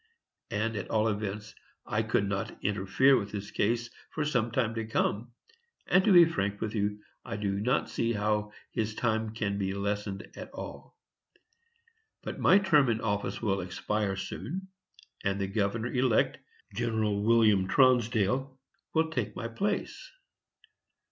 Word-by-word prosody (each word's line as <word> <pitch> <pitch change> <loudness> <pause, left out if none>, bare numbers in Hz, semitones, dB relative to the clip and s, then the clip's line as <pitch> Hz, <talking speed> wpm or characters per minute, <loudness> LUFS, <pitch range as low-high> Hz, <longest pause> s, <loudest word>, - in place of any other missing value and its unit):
And, 115 +2 -1
at 100 - -5
all 110 0 +2
events, 105 0 -4 0.3
I 105 - 0
could 110 -2 +1
not 100 -1 -3
interfere 105 +7 +3
with 100 - -5
his 100 -1 -6
case 120 +3 0 0.2
for 155 - -2
some 125 -6 +1
time 115 -1 0
to 115 -1 -3
come; 115 +1 -1 0.5
and, 185 +1 +4
to 215 - +5
be 175 -2 +9
frank 100 -11 -2
with 105 -1 -3
you, 105 -1 -1 0.2
I - - -5
do 100 -1 -1
not 125 +7 +1
see 115 0 -1
how 105 0 0 0.2
his 110 -1 -2
time 110 -2 0
can 100 -3 -1
be 95 0 -1
lessened 100 0 -3
at - - -8
all. - - -9 1.3
But - - -5
my 190 - +6
term 155 -10 +4
of 110 -1 +1
office 105 +1 -2
will 100 -3 +1
expire 95 +2 -2
soon, 180 - -5 0.5
and 100 0 0
the 100 - 0
governor 105 +4 -1
elect, 125 -3 +2 0.3
Gen. 115 +1 -1 0.2
William 110 -4 +4
Tronsdale, 125 +1 +2 0.4
will 160 0 +2
take 110 -8 -2
my 115 - -4
place. 200 - -3
110 Hz, 150 wpm, -29 LUFS, 100-120 Hz, 1.3 s, be